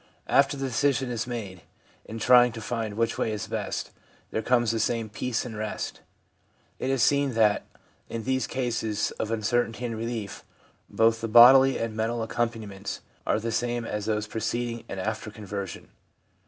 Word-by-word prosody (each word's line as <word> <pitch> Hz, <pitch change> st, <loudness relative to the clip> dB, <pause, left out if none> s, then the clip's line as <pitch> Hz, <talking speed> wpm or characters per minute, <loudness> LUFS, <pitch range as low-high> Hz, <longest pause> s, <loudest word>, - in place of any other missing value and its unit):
After 140 Hz, +1 st, +3 dB
the 135 Hz, -, -2 dB
decision 130 Hz, +1 st, +1 dB
is 115 Hz, -1 st, -2 dB
made, 100 Hz, -7 st, -5 dB, 0.4 s
in 110 Hz, -, -7 dB
trying 125 Hz, +1 st, +6 dB
to 115 Hz, -, -6 dB
find 110 Hz, -2 st, -3 dB
which 115 Hz, +1 st, 0 dB
way 110 Hz, -, 0 dB
is 105 Hz, -1 st, -3 dB
best, -, -, -4 dB, 0.4 s
there 110 Hz, -, -1 dB
comes 120 Hz, 0 st, +2 dB
the 115 Hz, -, -1 dB
same 115 Hz, 0 st, 0 dB
peace 115 Hz, +3 st, -2 dB
and 115 Hz, -3 st, -6 dB
rest/ 110 Hz, 0 st, -4 dB, 0.8 s
It 130 Hz, -, -2 dB
is 135 Hz, -3 st, +2 dB
seen 140 Hz, -3 st, +2 dB
that, 105 Hz, -2 st, +3 dB, 0.4 s
in 115 Hz, -1 st, -4 dB
these 130 Hz, -1 st, 0 dB
cases 115 Hz, -4 st, -1 dB
of 110 Hz, -, -2 dB
uncertainty 115 Hz, +2 st, 0 dB
and 115 Hz, -1 st, -3 dB
relief, 115 Hz, -2 st, -5 dB, 0.5 s
both 115 Hz, 0 st, +2 dB
the 115 Hz, -, -2 dB
bodily 130 Hz, +4 st, +8 dB
and 115 Hz, -1 st, -3 dB
mental 115 Hz, +1 st, -1 dB
accompaniments 110 Hz, -4 st, -3 dB, 0.3 s
are -, -, +2 dB
the 115 Hz, +1 st, -3 dB
same 120 Hz, +1 st, -1 dB
as 105 Hz, -1 st, -4 dB
those 105 Hz, -1 st, 0 dB
preceding 115 Hz, +2 st, -3 dB
and 95 Hz, -, -5 dB
after 110 Hz, +2 st, -3 dB
conversion. 100 Hz, -3 st, -7 dB
115 Hz, 170 wpm, -27 LUFS, 110-120 Hz, 0.8 s, bodily